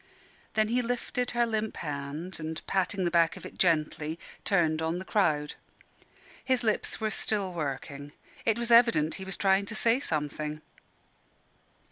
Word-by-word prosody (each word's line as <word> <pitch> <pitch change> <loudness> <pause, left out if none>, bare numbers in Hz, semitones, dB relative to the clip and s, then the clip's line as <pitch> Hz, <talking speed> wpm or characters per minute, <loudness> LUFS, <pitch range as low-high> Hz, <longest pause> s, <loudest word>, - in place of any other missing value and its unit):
Then 215 0 +3
he 245 +2 +2
lifted 245 +1 -2
her 240 0 +2
limp 220 -1 -2
hand, 150 +4 -5
and 160 0 -5
patting 190 0 0
the 175 - +1
back 170 -1 +3
of - - -10
it - - -10
gently, 160 -2 +1 0.3
turned 160 -5 +2
on 160 +2 0
the 185 - -6
crowd. 155 -9 +1 0.9
His 255 -2 +1
lips 215 -2 0
were 220 -1 -1
still 200 -2 -1
working. 145 -2 -4 0.3
It 225 -1 +2
was 235 0 -2
evident 230 -10 +5
he - - -5
was 190 -1 -3
trying 195 0 +3
to 225 - -4
say 230 +3 +3
something. 150 - -3
185 Hz, 155 wpm, -29 LUFS, 155-220 Hz, 0.9 s, evident